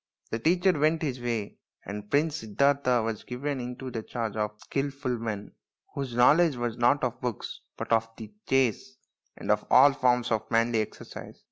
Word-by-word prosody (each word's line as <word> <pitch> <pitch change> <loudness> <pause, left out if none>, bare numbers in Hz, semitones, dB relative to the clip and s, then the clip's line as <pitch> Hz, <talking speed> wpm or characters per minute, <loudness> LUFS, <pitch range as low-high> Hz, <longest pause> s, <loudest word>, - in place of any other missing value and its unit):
The 115 - -1
teacher 180 +7 +3
went 155 +2 +2
his 130 -4 -2
way, 115 -4 -3 0.3
and 105 +1 -7
Prince 150 +3 +2
Siddartha 125 +2 +2
was 110 -1 -3
given 135 +3 -3
into 125 +1 -6
the 115 - -3
charge 115 -1 -4
of 105 -1 -2
skilful 135 -2 -3
men, 105 -3 -4 0.4
whose 135 -4 -4
know 120 +3 +7
ledge 165 -3 +3
was 120 -2 -2
not 120 +5 +3
of 125 0 -2
books 125 -5 -4 0.2
but - - -6
of 115 0 +2
the 110 -2 -9 0.2
chase 120 -11 +1 0.4
and - - -1
of - - +2
all 140 +2 +7
forms 125 -3 +2
of 110 -1 -1
manly 115 0 +2
exercise. 105 - -8
125 Hz, 175 wpm, -28 LUFS, 115-140 Hz, 0.4 s, know